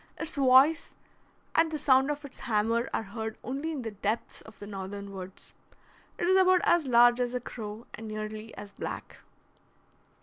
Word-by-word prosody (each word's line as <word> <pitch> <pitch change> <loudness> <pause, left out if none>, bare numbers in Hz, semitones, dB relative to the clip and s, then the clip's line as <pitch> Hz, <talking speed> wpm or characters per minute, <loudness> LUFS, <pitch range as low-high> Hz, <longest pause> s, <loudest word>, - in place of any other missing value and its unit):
Its 320 0 -4
voice 275 +4 +4 0.6
and 325 0 +4
the 310 - -2
sound 265 -1 +4
of 295 0 -3
its 275 - -12
hammer 230 +2 0
are - - -1
heard 220 +1 -6
only 280 +6 -3
in 285 -5 -4
the 225 - -4
depths 210 +2 -3
of 220 -2 -15
the 205 - -9
northern 200 0 -6
woods. 190 0 -10 0.6
It - - -1
is 375 +2 +4
about 370 -1 +5
as 345 -5 +3
large 240 0 +6
as 245 0 -1
a - - 0
crow, 220 -2 -8
and 225 - -8
nearly 215 +1 -6
as 205 0 -9
black. - - -6
235 Hz, 175 wpm, -29 LUFS, 215-285 Hz, 0.6 s, large